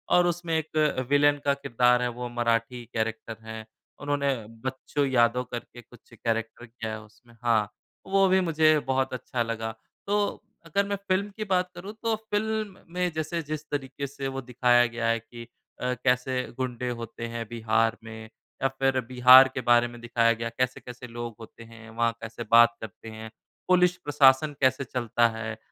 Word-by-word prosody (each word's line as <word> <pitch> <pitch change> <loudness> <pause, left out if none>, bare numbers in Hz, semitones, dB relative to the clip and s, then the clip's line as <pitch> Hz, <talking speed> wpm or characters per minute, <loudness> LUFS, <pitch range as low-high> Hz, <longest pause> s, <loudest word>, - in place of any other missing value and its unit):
और 175 0 +5
उसमें 170 -1 -1
एक 155 -2 0
विलेन 145 0 +4
का 140 - +4
किरदार 125 -2 +2
है, 125 - +1
वो 120 +1 -6
मराठी 120 0 -1
कैरेक्टर 110 0 -3
हैं, 110 0 -7 0.3
उन्होंने 145 -1 0 0.3
बच्चू 135 +2 -2
यादव 125 -2 +2
करके 120 0 -7
कुछ 120 0 -20
कैरेक्टर 115 +1 -3
किया 115 -1 -6
है 110 0 -6
उसमें। 110 +3 -20
हाँ, 110 -3 +2 0.4
वो 195 0 +4
भी 190 +1 +4
मुझे 155 -3 +4
बहुत 130 0 0
अच्छा 125 -1 -2
लगा। 115 -1 -3 0.4
तो 205 +1 +2 0.5
अगर 200 +5 0
मैं 200 - -1
फ़िल्म 190 +2 +1
की 215 - -2
बात 185 -3 0
करूँ, 190 +4 -8
तो 225 -1 +1
फ़िल्म 215 -1 -3 0.2
में 180 0 0
जैसे 160 +2 -3
जिस 155 0 -5
तरीके 140 -1 -4
से 135 0 -5
वो 135 - -3
दिखाया 120 -1 +3
गया 120 -1 -2
है 115 0 +2
कि 115 +1 -12 0.3
अ, 125 0 0
कैसे 125 0 +1 0.2
गुंडे 125 -1 -3
होते 115 -1 -6
हैं 115 0 -5
बिहार 115 0 +1
में, 110 -1 -9 0.3
या - - +5
फिर 135 -1 +2
बिहार 130 +1 +8
के 130 - -3
बारे 120 0 +4
में 120 0 -11
दिखाया 115 -1 +2
गया, 115 0 -4
कैसे-कैसे 125 +1 -4
लोग 120 0 -6
होते 115 +1 -12
हैं, 115 0 -13
वहाँ 115 +1 +1
कैसे 115 +1 -6
बात 115 0 +7
करते 110 +1 -9
हैं, 110 0 -8 0.4
पुलिस 180 -1 +4
प्रशासन 145 +1 +4
कैसे 130 +1 +3
चलता 120 -2 +1
है, 110 0 -5
125 Hz, 175 wpm, -27 LUFS, 115-145 Hz, 0.5 s, बिहार